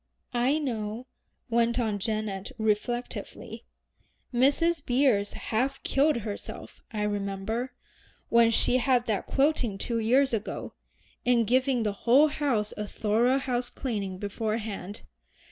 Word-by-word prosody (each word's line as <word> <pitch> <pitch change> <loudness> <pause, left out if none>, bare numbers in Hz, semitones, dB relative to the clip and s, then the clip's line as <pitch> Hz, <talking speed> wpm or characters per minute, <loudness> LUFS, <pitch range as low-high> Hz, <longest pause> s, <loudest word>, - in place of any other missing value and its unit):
"I 250 +5 +2
know," 230 -5 -3 0.4
went 235 0 +2
on 215 -4 0
Janet 215 0 -3
reflectively. 220 +3 -3 0.7
"Mrs. 285 +6 +3
Beers 245 -6 +2
half 265 +5 -2
killed 295 +3 +3
herself, 205 -1 -7
I 210 -2 -2
remember, 205 +4 -2 0.5
when 235 -1 +5
she 235 +2 +3
had 250 -1 +2
that 215 -4 -1
quilting 270 -7 +1
two 230 +3 -2
years 255 +4 +3
ago, 220 -1 -3 0.5
in 245 -1 +3
giving 255 +1 +2
the 210 -2 0
whole 255 +9 +4
house 260 -9 -1
a 210 0 -4
thorough 230 +6 +2
house 250 -2 -2
cleaning 205 -8 -4
beforehand. 210 -1 -4
235 Hz, 120 wpm, -28 LUFS, 210-255 Hz, 0.7 s, when